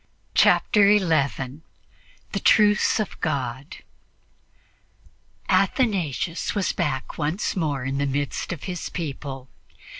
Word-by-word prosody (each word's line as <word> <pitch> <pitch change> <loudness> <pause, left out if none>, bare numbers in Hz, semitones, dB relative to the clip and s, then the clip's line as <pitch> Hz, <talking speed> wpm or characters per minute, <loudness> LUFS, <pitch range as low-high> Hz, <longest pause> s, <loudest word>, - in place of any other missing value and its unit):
Chapter 205 -2 +4
11 155 -8 +1 0.7
THE - - -2
TRUCE 210 +1 +4
OF 215 - -4
GOD 135 -2 -3 1.7
ATHANASIUS 185 - 0
was 200 -2 +1
back 130 +1 -3
once 155 +9 -1
more 150 -7 -1
in 135 +1 -2
the 140 - 0
midst 140 +4 -2
of 170 -5 -6
his 180 -2 -5
people. 135 -5 -6
155 Hz, 100 wpm, -24 LUFS, 135-190 Hz, 1.7 s, Chapter